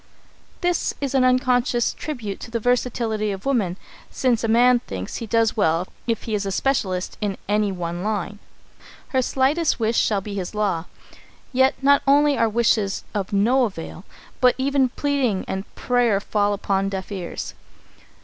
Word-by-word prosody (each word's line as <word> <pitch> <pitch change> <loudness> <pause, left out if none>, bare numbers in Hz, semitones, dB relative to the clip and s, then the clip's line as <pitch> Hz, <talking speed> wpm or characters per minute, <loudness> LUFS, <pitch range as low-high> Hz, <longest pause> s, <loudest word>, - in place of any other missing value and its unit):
This 355 -1 0
is 280 -2 -2
an 265 -2 +3
unconscious 250 -2 +2
tribute 230 -10 -5
to - - -8
the 230 0 -2
versatility 230 -3 0
of 195 0 -7
woman, 210 -10 0 0.3
since 245 -3 0
a - - +1
man 240 +2 +5
thinks 95 - -6
he 230 - -6
does 225 0 +2
well 170 -3 +1 0.2
if 230 -2 -1
he 225 - -4
is 205 -1 0
a 195 - -3
specialist 190 -6 -1
in 200 -2 -2
any 205 0 +1
one 175 -1 -4
line. 205 -1 -3 0.7
Her 260 - +2
slightest 275 +6 +1
wish 225 0 +2
shall 210 -2 +2
be 200 +1 -7
his 195 +1 -4
law! 195 -6 0 0.7
Yet 265 +1 +4
not 280 +1 +5
only 290 +1 +5
are 230 -3 +2
wishes 215 -3 +1
of 200 -3 -3
no 240 +6 +3
avail, 180 -3 -7 0.4
but 250 -1 +4
even 270 -1 +2
pleading 265 -7 0
and 190 +1 -5
prayer 245 -5 +2
fall 205 0 0
upon 195 -1 0
deaf 190 0 -5
ears. 185 -4 -5
220 Hz, 165 wpm, -22 LUFS, 195-255 Hz, 0.7 s, man